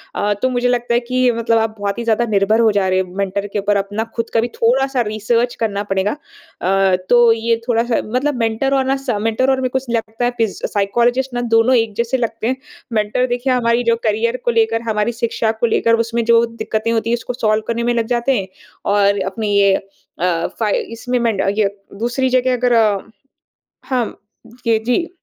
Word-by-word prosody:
अ, 205 0 +1
तो 255 - +2
मुझे 245 0 0
लगता 240 -1 0
है 240 - +4
कि 250 0 +1
मतलब 230 0 +1
आप 220 -1 -1
बहुत 200 +1 -2
ही - - -3
ज़्यादा 230 +1 +1
निर्भर 215 0 +2
हो 225 -2 +4
जा 200 -2 +1
रहे 185 0 +2
हो 185 -1 -4
मेंटर 200 +1 -2
के 210 - 0
ऊपर 205 +1 +1
अपना 205 +2 -2
ख़ुद 230 -1 -2
का - - +3
भी 235 - -1
थोड़ा-सा 265 +2 +2
रिसर्च 230 +3 0
करना 205 -3 -1
पड़ेगा। 195 0 0 0.5
अ, 190 +1 +3
तो 240 -1 +6
ये 230 +1 +1
थोड़ा-सा 235 -1 +1
मतलब 255 +6 -1
मेंटर 230 +4 0
और 270 -1 +2
ना 265 +1 +1
स 270 0 -8
मेंटर 225 +4 +1
और 265 - +2
मेरे 255 - 0
को 265 - -1 0.2
लगता 225 +1 -2
है 245 - +1
पिज़ 225 -3 -1
साइकोलॉज़िस्ट 240 +6 0
ना 245 - -1
दोनों 225 +3 +4
एक 225 -3 +1
जैसे 235 +3 0
लगते 230 -2 -2
हैं। 260 - +1 0.4
मेंटर 215 +3 +1
देखिए 245 +1 0
हमारी 235 -1 +1
जो 230 -1 +3
करियर 230 +3 0
को 240 - +3
लेकर 225 0 +1
हमारी 210 +1 0
शिक्षा 225 -1 0
को - - +2
लेकर 230 0 +2
उसमें 235 0 -1
जो 230 0 +5
दिक्कतें 230 -1 -3
होती 230 0 0
हैं 235 - +3
उसको 235 +2 -5
सॉल्व 215 -3 0
करने 235 0 -1
में 240 0 +1
लग 230 -1 0
जाते 245 +2 +1
हैं। 190 - -5 0.5
और 200 0 +3
अपनी 210 0 -2
ये 200 -1 +5 0.5
अ, 170 -2 +1
फ़ाई 215 -3 +1
इसमें 245 +2 -2
मेंड 230 -4 0 0.2
ये 210 -2 +3 0.3
दूसरी 245 +3 0
जगह 255 0 +2
अगर 245 -1 +2 1.1
हाँ 250 -3 0
म - - -8 0.5
ये, 225 -1 +4
जी। 245 +9 0
230 Hz, 210 wpm, -18 LUFS, 215-245 Hz, 1.1 s, तो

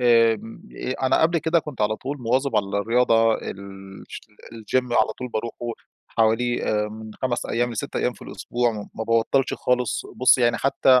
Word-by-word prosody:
آمم 115 -2 +3 0.2
آآ 130 - -3
أنا - - +3
قبل 165 +1 +3
كده 160 +2 +2
كنت 150 -7 -7
على 110 +1 +1
طول 140 +6 -5
مواظب 130 +4 +1
على 100 - +2
الرياضة 115 0 +3
الش 95 -1 -8 0.3
الgym 115 +3 -1
على 110 -1 +3
طول 125 0 -4
باروحه 115 0 -4 0.5
حوالي 115 +2 +1
آآ 105 0 0
من 110 0 -9
5 130 -2 -1
أيام 120 +1 0
ل6 115 - -4
أيام - - +1
في - - -15
الأسبوع، 120 0 -1
ما 105 -2 -5
ب - - -13
ما 110 - -4
بابطلش 115 +4 +2
خالص، 125 -4 0
بصي 130 0 +5
يعني 120 0 +3
حتى 130 -1 +4
115 Hz, 180 wpm, -23 LUFS, 110-125 Hz, 0.5 s, بصي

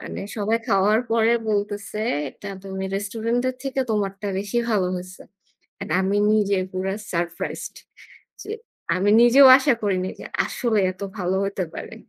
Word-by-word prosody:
মানে - - -6
সবাই 220 +2 +1
খাওয়ার 210 +2 +3
পরে 230 0 +3 0.2
বলতেছে 205 0 -2 0.3
এটা 200 +8 -9
তুমি 190 0 -5
restaurant 225 +4 -2
এর 255 - -3
থেকে 270 -1 -2
তোমারটা 200 -1 -2
বেশি 205 +4 -2
ভালো 200 -4 +2
হয়েছে। 185 +1 -9 0.6
And - - -7
আমি 195 +2 +1
নিজে 200 -2 +2
পুরা 190 +1 -2 0.2
surprised 170 -1 -4 0.7
যে 420 - -6 0.4
আমি 195 +3 +2
নিজেও 260 +3 +8
আশা 270 -1 +2
করিনি 185 -2 0
যে - - -7 0.2
আসলে 230 -4 -1
এত 185 - -22 0.2
ভালো 185 0 0
হইতে 195 -1 -2
পারে। - - -7
205 Hz, 150 wpm, -23 LUFS, 190-225 Hz, 0.7 s, নিজেও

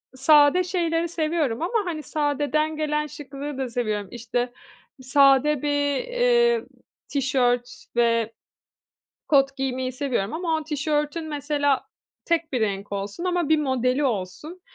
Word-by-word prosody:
sade 295 +5 +5
şeyleri 340 -2 0
seviyorum 315 -6 -1
ama, 410 +3 0
hani, 315 -4 -4
sadeden 300 +2 0
gelen 300 0 -1
şıklığı 285 -1 -7
da 260 -2 -2
seviyorum. 215 -4 -2
İşte, 245 +1 -3 0.5
sade 275 +1 +4
bir, 290 -1 +1
eee, 480 - +2 0.4
tişört 245 -3 0
ve 230 -1 +2 1.0
kot 275 -2 +3
giymeyi 260 -1 -2
seviyorum 250 -6 -2
ama 325 0 -1
o 315 - -4
tişörtün 300 +1 -1
mesela 285 -2 0 0.4
tek 335 -3 0
bir 250 - 0
renk 200 -1 -2
olsun 200 - -4
ama 355 -4 0
bir 315 -1 +4
modeli 260 0 +1
olsun, 250 - -3
285 Hz, 125 wpm, -24 LUFS, 255-315 Hz, 1.0 s, sade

